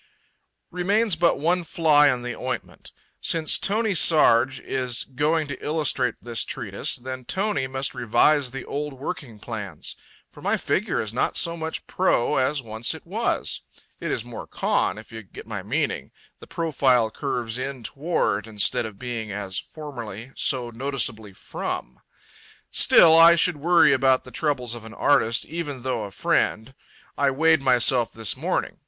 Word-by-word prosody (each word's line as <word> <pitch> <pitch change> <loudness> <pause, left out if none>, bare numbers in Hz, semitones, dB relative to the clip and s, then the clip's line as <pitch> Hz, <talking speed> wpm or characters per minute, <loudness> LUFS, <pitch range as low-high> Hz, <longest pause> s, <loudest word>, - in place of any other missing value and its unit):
Remains 200 +3 +1
but 170 +1 +2
one 175 +4 +1
fly 155 -2 +4
in 125 -1 -3
the 120 -1 -4
ointment. 125 -2 -5 0.3
Since 160 -2 +2
Tony 215 +2 +1
Sarg 135 -6 +4
is 125 -3 -1
going 150 +4 0
to 130 - -7
illustrate 145 -6 +1
this 120 -1 0
treatise, - - -1
then 130 +1 -6
Tony 190 - -1
must 135 +1 -2
revise 130 +4 +2
the 135 +1 -7
old 145 0 -4
working 135 -4 -6
plans. 105 -6 -6 0.4
For - - -15
my - - +1
figure - - -1
is 110 -1 -3
not 125 - 0
so 170 0 0
much 160 -1 -5
pro 150 -7 +1
as 135 +1 0
once 110 +1 -2
it - - -12
was. - - -2 0.4
It - - -4
is - - -2
more - - -8
con, - - 0
if - - -12
you 110 0 -7
get 100 - -12
my - - -5
meaning - - -2 0.3
the - - -13
profile 130 -8 +1
curves 125 -4 -3
in 130 -1 -5
toward, 115 - -1
instead 105 +1 +1
of 105 -3 -12
being, 115 -3 -5
as 100 -1 -3
formerly, 120 -6 -8
so 125 -3 0
noticeably 115 -4 -3
from. 65 -8 -6 0.7
Still, 160 -1 +7
I 165 +1 +8
should 170 -1 +2
worry 170 +2 +4
about 130 -1 +3
the 125 - -13
troubles 125 -3 -1
of 120 -2 -8
an 110 0 -11
artist, 115 -5 +2
even 145 -6 -5
though 125 -5 -2
a - - -7
friend. 110 +4 0 0.5
I 140 -1 +3
weighed 160 +2 +3
myself 125 -2 +3
this 110 -2 -2
morning. - - -2
130 Hz, 160 wpm, -24 LUFS, 115-155 Hz, 0.7 s, I